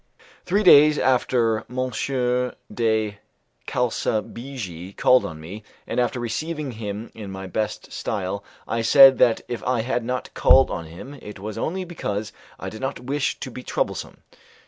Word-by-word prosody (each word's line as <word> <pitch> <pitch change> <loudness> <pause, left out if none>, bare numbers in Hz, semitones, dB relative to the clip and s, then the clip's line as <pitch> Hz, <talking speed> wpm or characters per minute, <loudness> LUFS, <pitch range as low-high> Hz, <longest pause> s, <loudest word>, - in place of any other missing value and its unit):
Three 200 +4 +2
days 150 -4 +8
after, 120 -3 +2
M. 130 +1 -2 0.8
de 110 -3 0 0.5
Calsabigi 110 -5 -3
called 130 0 +5
on 80 - -9
me; 90 +7 -8 0.2
and - - -2
after 125 0 0
receiving 150 +5 -3
him 110 -1 -6
in 105 -3 -8
my 95 0 -6
best 105 +3 -3
style 100 -1 -3 0.2
I 115 +1 -1
said 135 +3 +8
that 120 -3 +4
if 120 - -5
I 125 -2 +1
had 120 0 -1
not 125 +1 -4
called - - +5
on 85 - -4
him 110 - -10
it 105 - -9
was 105 +2 -6
only 185 +3 -2
because 110 - -4 0.3
I - - -6
did 110 - -7
not 135 +1 -3
wish 140 +3 -1
to 130 - -5
be 125 - -8
troublesome. - - -3
115 Hz, 155 wpm, -23 LUFS, 105-130 Hz, 0.8 s, days